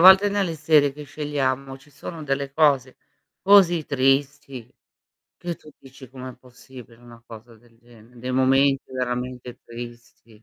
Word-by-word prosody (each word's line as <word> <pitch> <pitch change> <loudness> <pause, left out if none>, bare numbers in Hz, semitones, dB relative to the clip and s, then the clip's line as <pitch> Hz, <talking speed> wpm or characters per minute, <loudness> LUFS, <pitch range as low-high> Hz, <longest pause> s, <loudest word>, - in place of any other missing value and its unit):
volte 190 +3 +8
nelle 195 -5 -1
serie 150 -2 +3
che 150 - -9
scegliamo, 140 -2 -3
ci 140 +2 -21
sono 155 +3 -8
delle 140 -1 -2
cose 140 -4 +2 0.5
così 185 -5 +5
tristi, 135 -2 0 0.7
che 175 -1 -5
tu 155 - -16
dici: 135 -1 -14
"Com'è 130 -1 -9
possibile 125 -1 -15
una 120 -1 -15
cosa 115 +1 -13
del 115 0 -25
gene" 120 0 -19
Dei 125 +2 -4
momenti 135 +1 +2
veramente 125 -1 -4
tristi. 115 -2 -12
135 Hz, 140 wpm, -23 LUFS, 125-145 Hz, 0.7 s, volte